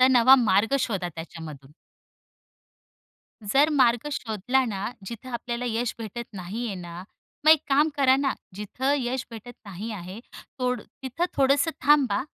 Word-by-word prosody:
तर 255 - +7
नवा 255 +1 +7
मार्ग 210 +7 +3
शोधा 195 -8 -2
त्याच्यामधून. 155 -4 -9 1.7
जर 275 +9 +3
मार्ग 255 -2 +3
शोधला 245 +2 0
ना, 205 -2 -3
जिथे 230 +5 -8
आपल्याला 240 0 -4
यश 230 +1 -1
भेटत 230 +2 -6
नाहीये 200 +4 -5
ना, 175 -1 -8 0.4
मग 310 - +9
एक 315 -2 +6
काम 295 +3 +4
करा 265 -2 +5
ना, 275 -1 0 0.2
जिथे 250 +8 -2
यश 250 +1 -2
भेटत 230 +2 -9
नाही 200 +3 -6
आहे, 190 +1 -7 0.4
तोड 250 -3 0
तिथे 270 +6 -4
थोडंसं 280 +4 +3
थांबा. 265 -7 +4
235 Hz, 140 wpm, -25 LUFS, 200-265 Hz, 1.7 s, मग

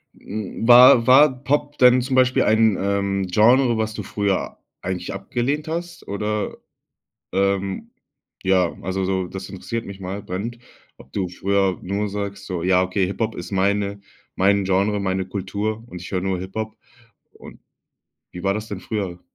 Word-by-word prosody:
Hm, 110 +2 -5
war 120 -1 +8
war 130 0 +6
Pop 145 +1 0
denn 125 0 +6
zum 130 +1 -2
Beispiel 130 0 +4
ein, 110 -2 +3
ähm, 100 -1 0
Genre, 120 +5 +4
was 110 0 -1
du 105 - -5
früher 100 -1 -2 0.2
eigentlich 90 0 -4
abgelehnt 140 +6 -2
hast 170 +1 -5
oder, 105 +1 -2 0.8
ähm 100 0 0 0.6
ja, 95 -2 +2
also, 95 +1 -2
so 95 -1 -1
das 95 +1 -7
interessiert 115 +4 -5
mich 100 0 -9
mal, 95 +2 -5
brennend, 105 +5 -5 0.4
ob - - -17
du 95 -3 -2
früher 95 +1 0
nur 100 +2 -2
sagst, 100 -1 -5
so: 90 -3 -4
„Ja, 90 +1 +3
okay, 95 +1 0
Hip-Hop 110 +4 -2
ist 90 - -7
meine 100 +1 0 0.3
mein 100 +1 +3
Genre, 100 +2 +1
meine 95 -1 -1
Kultur 100 +3 -3
und 90 -6 -9
ich 90 - -9
höre 95 - 0
nur 95 -1 -1
Hip-Hop.“ 110 +4 -5 0.6
Und - - -14 0.7
wie 90 - -8
war 100 0 +2
das 105 +1 -5
denn 100 - -5
früher? 95 -5 -4
100 Hz, 160 wpm, -22 LUFS, 95-110 Hz, 0.8 s, war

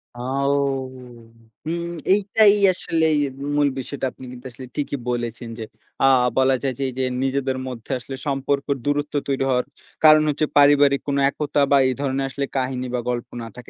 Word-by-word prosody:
আও 135 +3 -1 1.1
হুম, 170 +2 -2 0.3
এইটাই 205 +1 +4 0.2
আসলেই 160 -3 +1 0.4
মূল 145 -1 +3
বিষয়টা 135 +1 -4
আপনি 130 - -12
কিন্তু 125 +1 -12
আসলে 130 +2 -10
ঠিকই 145 -1 -2
বলেছেন 120 -1 -3
যে, - - -4 0.4
আ - - +5 0.3
বলা 130 0 +4
যায় 135 -2 0
যে, - - -1
এই - - -8
যে - - +1 0.2
নিজেদের 135 0 -1
মধ্যে 125 0 -8
আসলে 135 +2 -8
সম্পর্ক 140 0 -1 0.2
দূরত্ব 145 0 -1
তৈরি 135 -1 0
হওয়ার 125 -1 +1 0.4
কারণ 155 0 +8
হচ্ছে 150 +1 0
পারিবারিক 145 -1 +5
কোন 140 -1 0
একতা 145 0 -2
বা 140 - +6
এই 130 - +1
ধরণের 135 -1 -1
আসলে 140 +1 -3
কাহিনী 130 -1 -2
বা - - 0
গল্প 120 -1 -2
না 115 - -6
থাকে। 125 - -12
135 Hz, 170 wpm, -22 LUFS, 130-145 Hz, 1.1 s, কারণ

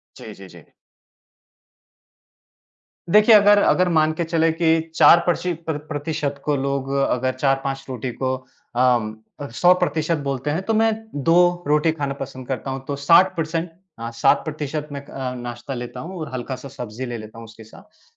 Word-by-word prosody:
जी, 110 - -10
जी, 95 -1 -13
जी। 85 -3 -15 2.5
देखिए, 215 +3 +7
अगर 205 0 +6
अगर 180 0 +3
मान 155 0 +3
के 170 - -2
चले 165 0 +1
कि 165 0 +2 0.2
4 170 - +7
प्रसि 175 0 0
प्र 165 0 -5
प्र 145 - -4
प्रतिशत 145 -2 -3
को 150 -1 +1
लोग 135 0 -2
अगर 130 0 0
4-5 135 0 -1
रोटी 125 0 -4
को 130 0 0 0.4
अ, 120 +1 -1
100% 165 +2 +2
बोलते 140 +1 -2
हैं 165 +5 -1
तो 225 - -1
मैं 225 +1 +3 0.4
2 165 - +5 0.3
रोटी 150 +2 +3
खाना 145 -3 -3
पसन्द 130 -2 -7
करता 135 0 -4
हूँ 135 0 -5
तो 140 - -2
60% 165 +2 +2 0.3
अ 115 0 -4
60% 150 +4 0
मैं 140 0 -7
अ, 130 -2 -5
नाश्ता 120 +1 -6
लेता 120 -1 -6
हूँ 180 +3 -7
और 155 -4 -6
हल्का 130 +1 -4
सा 140 - -10
सब्ज़ी 125 -2 -7
ले 120 -1 -5
लेता 110 +1 -11
हूँ 115 - -9
उसके 115 0 -14
साथ 110 - -18
140 Hz, 170 wpm, -22 LUFS, 125-160 Hz, 2.5 s, देखिए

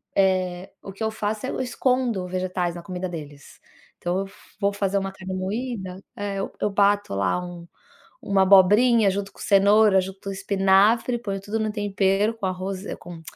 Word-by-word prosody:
Eh, 185 -2 +1
o 195 - -7
que 195 - -18
eu 220 - +1
faço, 215 +2 -3
é: - - -3
eu - - -3
escondo 245 -6 0
vegetais 180 -1 -2
na 170 - -8
comida 185 -1 -4
deles. 145 -4 -10 0.4
Então, 175 +2 -1
eu 195 0 -4 0.3
vou 200 0 +1
fazer 200 -1 0
uma 195 0 -2
carne 190 0 -7
moída 190 -1 -4 0.2
é, 200 -1 -3
eu 195 - -3
eu 210 - +1
bato 200 - +2
lá 100 - +1
um 175 -1 -9 0.6
uma 195 -1 +3
abobrinha 205 +3 +6
junto 200 0 -4
com - - -19
cenoura, 200 0 +5
junto 190 +1 -7
com 195 - -4
espinafre, 200 +5 +3
ponho 195 -4 -4
tudo 215 +3 -3
no 215 -1 -1
tempero, 205 +1 +1
com 205 - -5
arroz, 185 +1 -4
com 170 -2 -10
195 Hz, 180 wpm, -24 LUFS, 185-210 Hz, 0.6 s, abobrinha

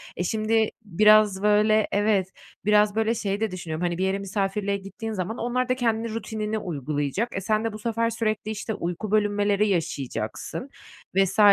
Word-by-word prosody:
E, 180 - -2
şimdi, 220 +3 +1 0.2
biraz 210 +1 +5
böyle 210 +1 +4
evet, 200 -2 +1 0.3
biraz 210 0 +4
böyle 225 +1 +1
şeyi 205 -3 -2
de 220 -3 0
düşünüyorum, 170 -2 -4
hani, 175 -1 -1
bir 185 - -1
yere 195 +1 0
misafirliğe 200 0 -1
gittiğin 200 +3 -6
zaman 200 +3 -3
onlar 250 +1 -1
da 255 - +3
kendi 230 -2 -1
rutinini 220 -1 -3
uygulayacak. 150 - -2
E, - - -2
sen 215 +2 +1
de 225 -1 -2
bu 215 - -7
sefer 230 +1 0
sürekli, 215 -2 -2
işte, 220 +1 -4
uyku 180 +3 -4
bölünmeleri 205 -1 +2
yaşayacaksın 160 - -3 0.5
vs. 195 +1 +2
210 Hz, 165 wpm, -25 LUFS, 190-220 Hz, 0.5 s, biraz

